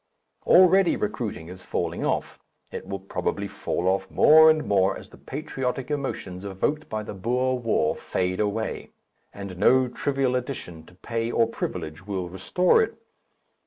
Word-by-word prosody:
Already 185 0 +6
recruiting 105 -5 -4
is 90 +1 -10
falling - - -3
off, - - -2 0.3
it - - -7
will 100 0 -3
probably 95 - -3
fall 90 - -3
off 95 0 0
more 160 +1 +7
and 155 -1 +2
more 95 -1 +2
as - - -12
the - - -15
patriotic 135 -2 -4
emotions 100 -10 -4
evoked 100 +11 -2
by 110 0 -3
the - - -7
Boer 125 +6 0
War 110 -10 +1
fade 90 0 -2
away, 105 +1 -2 0.4
and 100 -3 -8
no 130 +5 +4
trivial 135 0 -1
addition 105 - -5
to 90 - -17
pay 115 +4 -3
or 115 -1 +3
privilege 90 -5 -5
will 95 -3 -3
restore 180 - +2
it. 430 - -2
110 Hz, 155 wpm, -25 LUFS, 95-135 Hz, 0.4 s, more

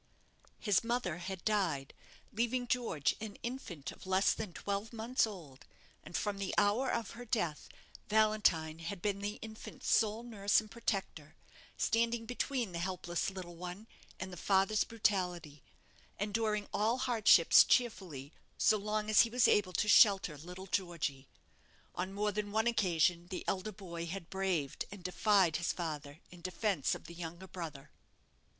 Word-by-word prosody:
His 205 -2 +2
mother 230 -8 -1
had 190 +1 -6
died, 175 -11 0 0.4
leaving 240 +3 0
George 235 - 0
an 215 -2 -6
infant 190 - -5
of - - -13
less 190 +1 +3
than 215 -4 -5
twelve 200 +4 -3
months 230 +1 +1
old; 155 -11 -10 0.4
and - - -4
from 205 -1 -2
the 195 - -2
hour 210 +6 +3
of 230 -4 -2
her 245 - -8
death, 205 -10 -2 0.4
Valentine 210 -7 +2
had 175 +3 -5
been 200 +2 -1
the 205 +1 -3
infant's 220 0 -2
sole 220 +1 +1
nurse 205 -4 +2
and 215 -1 -9
protector; 225 -4 -3 0.4
standing 230 0 +1
between 245 -2 -2
the 170 - -4
helpless 175 -1 -2
little 185 -3 -8
one 180 +4 -7 0.3
and 190 -1 -5
the - - -8
father's 195 +4 +2
brutality; 180 -9 -1 0.6
enduring 210 0 0
all 220 +4 +2
hardships 235 -9 +6
cheerfully, 180 - 0 0.2
so 215 - +4
long 210 +1 -2
as 215 -1 +7
he 230 - +2
was 245 0 +4
able 195 -3 +3
to 210 - +1
shelter 195 -6 +6
little 180 +5 -9
Georgy. 170 -8 -2 0.7
On 185 +2 -3
more 210 +1 0
than 205 0 -3
one 220 +2 +1
occasion, 175 -6 +2
the 185 - -5
elder 195 +3 -1
boy 170 -4 -7
had 180 0 -6
braved 185 -7 -1
and 200 -3 -10
defied 185 -2 +3
his 170 - 0
father 150 -3 -5
in 175 -1 -13
defence 185 - 0
of - - -10
the 170 - -10
younger 170 +2 -7
brother. 155 -6 -7
195 Hz, 155 wpm, -34 LUFS, 175-215 Hz, 0.7 s, as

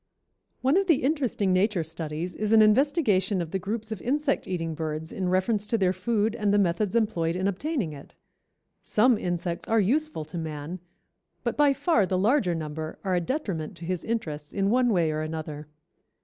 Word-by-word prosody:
_) - - -53 0.6
One 270 +7 +3
of 390 0 +2
the 320 -8 +3
interesting 255 -9 +1
nature 190 -1 +2
studies 160 +2 -4
is 215 +3 -1
an 220 -1 +8
investigation 215 - +3
of 165 -2 -4
the 190 - -1
groups 220 +4 -4
of 215 - -4
insect 285 +2 0
eating 165 -3 -2
birds 155 0 -4
in 185 -2 -2
reference 200 +3 +1
to 230 - +1
their 185 -3 +2
food 215 +3 0
and 210 -3 0
the 205 - +4
methods 200 +2 +1
employed 175 -8 +1
in 185 +1 0
obtaining 200 - -2
it. 140 -1 -12 0.7
Some 240 +3 +3
insects 175 -3 -3
are 225 - +3
useful 270 - 0
to 170 +3 -6
man, 155 +2 -5 0.6
but - - -1
by 290 -1 +4
far 270 - +2
the 185 - 0
larger 205 -3 +2
number 155 0 -5
are 190 -2 0
a 175 - +2
detriment 185 - -3
to 170 - -8
his 180 0 -2
interests 155 -10 -4
in 195 0 +1
one 250 0 +3
way 170 -5 +2
or 155 0 -2
another. 155 -1 -5
190 Hz, 190 wpm, -26 LUFS, 165-225 Hz, 0.7 s, an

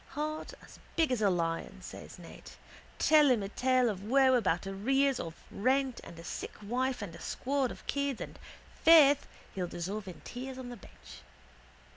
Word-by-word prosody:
—Heart 310 +1 -4
as - - -15 0.2
big 325 -5 +2
as 245 -3 0
a 205 - +4
lion, 165 -2 -2
says - - -9
Ned. - - -12 0.5
Tell 300 -2 +5
him 235 -5 +3
a 195 - -4
tale 255 +2 +2
of 200 -4 -2
woe 260 +4 +4
about 190 -8 +1
arrears 265 +8 +1
of 165 -1 -5 0.2
rent 260 +3 +1
and 170 - -11
a 165 - -10
sick - - -6
wife 250 +2 -1
and 180 -5 -7
a 170 - -11
squad 270 -1 -1
of - - -10
kids 280 -3 -1
and, - - -8 0.4
faith, 290 -4 +7 0.3
he'll 180 -2 -2
dissolve 190 +4 -5
in 180 - -9
tears 260 +1 -7
on 255 -1 -7
the 245 - -8
bench. - - -14
250 Hz, 180 wpm, -31 LUFS, 195-275 Hz, 0.5 s, faith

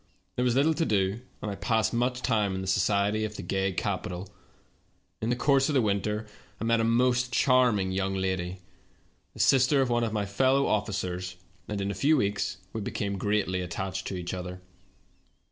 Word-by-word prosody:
There 125 - 0
was 125 -1 +2
little 145 +4 +4
to 165 - 0
do, 100 -3 +1 0.2
and 105 - -2
I - - -4
passed 110 +2 0
much 125 +1 0
time 105 -5 +1
in 95 - -3
the 95 - -5
societ^^ 100 +3 +2
of 105 -1 -4
the 100 - -6
gay 95 +2 0
capital. 90 +1 -3 0.9
In 110 - -1
the 120 - +2
course 135 +2 +3
of 150 - 0
the 130 - +5
winter 105 +1 -1 0.3
I - - -4
met 115 0 +2
a - - +2
most 125 +2 +2
charming 120 -8 +3
young 95 +1 -1
lady, 95 -1 -2 0.7
the - - -12
sister 135 +1 +4
of 130 -2 +2
one 120 0 +2
of 115 - -1
my 105 -2 -1
fel 130 +7 +2
low 140 - +3
officers, 95 -4 -2 0.3
and 105 -1 -3
in 100 0 -1
a - - -3
few 145 - +3
weeks 100 -3 -1 0.2
we 110 - -3
became 100 -1 -3
greatly 100 -2 0
attached 95 +1 -4
to 95 - -4
each 90 0 -4
other. 90 0 -5
105 Hz, 195 wpm, -28 LUFS, 95-125 Hz, 0.9 s, the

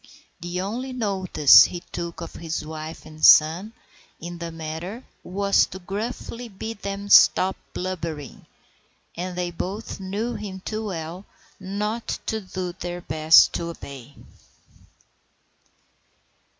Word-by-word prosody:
The 175 +1 -4
only 245 +7 -4
notice 190 - +6
he 175 - -5
took 170 0 -5
of 170 - -7
his 160 -2 -4
wife 155 +1 -7
and 155 0 -13
son 165 +7 +7 0.5
in 175 +1 -7
the 170 -1 -5
matter 165 +8 -6 0.2
was 200 +2 +2
to - - -8
gruffly 225 +5 -5
bid 220 +2 -7
them 200 0 -4
"stop 190 -1 +6 0.2
blubbering;" 165 -7 -5 0.7
and 180 +1 -5
they 175 -1 -2
both 195 +7 -5
knew 205 +5 -3
him 195 -4 -6
too 220 0 -3
well 175 0 -6 0.3
not 210 +4 -3
to 220 0 -2
do 185 -2 -5
their 175 -1 -6
best 155 -1 +5
to 170 - -2
obey. 140 -5 -10
185 Hz, 125 wpm, -24 LUFS, 165-200 Hz, 0.7 s, son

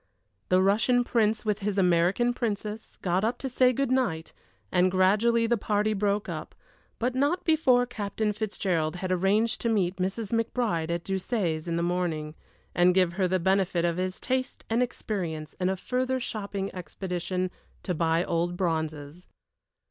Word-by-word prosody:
The 185 +1 +4
Russian 225 +5 +3
Prince, 220 -3 +1
with 210 -1 0
his 205 -1 -2
American 180 +6 +3
Princess, 215 -2 -4
got 180 +1 +1
up 230 +3 0
to 270 - -4
say 255 0 +4
good 270 +1 -1
night, 220 -12 0 0.4
and 180 +1 +4
gradually 210 +5 +3
the 235 -1 +1
party 210 +1 +1
broke 205 0 0
up, - - -6 0.4
but 245 +2 0
not 285 +8 +1
before 265 -7 +4
Captain 210 -2 -2
Fitzgerald 185 -6 -1
had 185 +1 -3
arranged 200 +6 +2
to 230 - 0
meet 190 -4 +1
Mrs. 195 +4 -2
McBride 230 -7 0
at 170 0 -2
Doucet's 190 -5 -2
in 170 - -1
the 170 - 0
morning, 170 -4 -1 0.4
and 180 +1 +4
give 180 -2 +3
her 185 0 +1
the 185 +1 +1
benefit 190 -1 +1
of 170 0 0
his 185 0 -2
taste 260 +1 -2
and 230 +2 +2
experience 175 -10 -3
in 180 0 +1
a 190 - -1
further 255 +5 -1
shopping 200 -4 -4
expedition 180 0 -3 0.3
to 180 - -1
buy 165 0 +1
old 175 +1 -1
bronzes. 160 -2 -3
195 Hz, 165 wpm, -27 LUFS, 175-230 Hz, 0.4 s, The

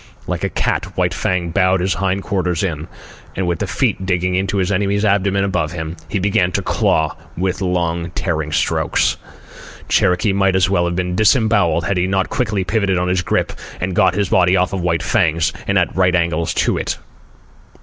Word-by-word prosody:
Like - - -3
a - - 0
cat, - - -2
White - - +1
Fang 90 -2 -1
bowed 95 +1 +2
his 95 +2 0
hind 95 0 -1
quarters 90 -3 -1
in, 80 -4 -3 0.5
and, 95 - -1
with 85 -2 -1
the - - -2
feet - - 0
digging 90 -1 0
into 95 +2 0
his 95 0 0
enemy's 100 +2 +1
abdomen 100 -1 +2
above 90 -5 -1
him, 80 -1 -5
he 105 - -1
began 95 -2 +1
to - - -1
claw 80 -2 +1 0.2
with 90 +2 -1
long 85 -2 -1
tearing 80 -4 -2
strokes. - - +1 0.7
Cherokee 90 +3 +2
might 95 -1 +2
well 85 -3 +2
have 85 0 -2
been 90 0 -2
disembowelled 105 - +3
had 95 - 0
he 90 +1 +1
not 95 0 0
quickly 110 -7 -1
pivoted 100 0 0
on 90 +1 0
his 90 0 +1
grip 85 - -1 0.3
and 90 0 -2
got 95 -1 +3
his 100 -3 0
body 90 0 +4
off 90 +1 0
of 95 - -2
White 85 -2 0
Fang's 80 -7 +1
and 100 - +2
at 90 - +1
right 90 -1 +3
angles 85 -1 0
to - - +1
it. - - -2
90 Hz, 190 wpm, -18 LUFS, 85-95 Hz, 0.7 s, body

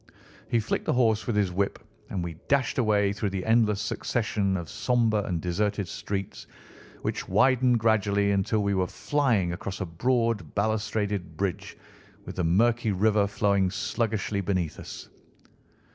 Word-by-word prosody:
He 120 - +2
flicked 110 - -2
the - - +1
horse 115 -4 +2
with 120 - 0
his 100 -3 +2
whip, 100 +2 -1 0.3
and 90 - -3
we 85 -2 -6
dashed 140 -2 +1
away 105 -4 +2
through 105 0 -2
the 95 -1 -4
endless 110 -3 +3
succession 105 -2 -1
of 85 -2 -5
sombre 115 -2 +1
and 90 -4 -2
deserted 100 +3 -1
streets, 95 +3 -5 0.6
which - - -3
widened 130 -2 +4
gradually, 100 -2 +2
until 100 +2 +1
we 100 0 +1
were 95 -1 +1
flying 115 -13 0
across 95 +2 -5
a 95 - -2
broad 115 +5 0
balustraded 105 -5 -1
bridge, 95 -2 -3 0.5
with - - -7
the 90 - 0
murky 110 +6 +2
river 105 +1 +2
flowing 100 -1 +1
sluggishly 105 0 -1
beneath 90 -5 -2
us. - - -9
105 Hz, 150 wpm, -27 LUFS, 95-110 Hz, 0.6 s, widened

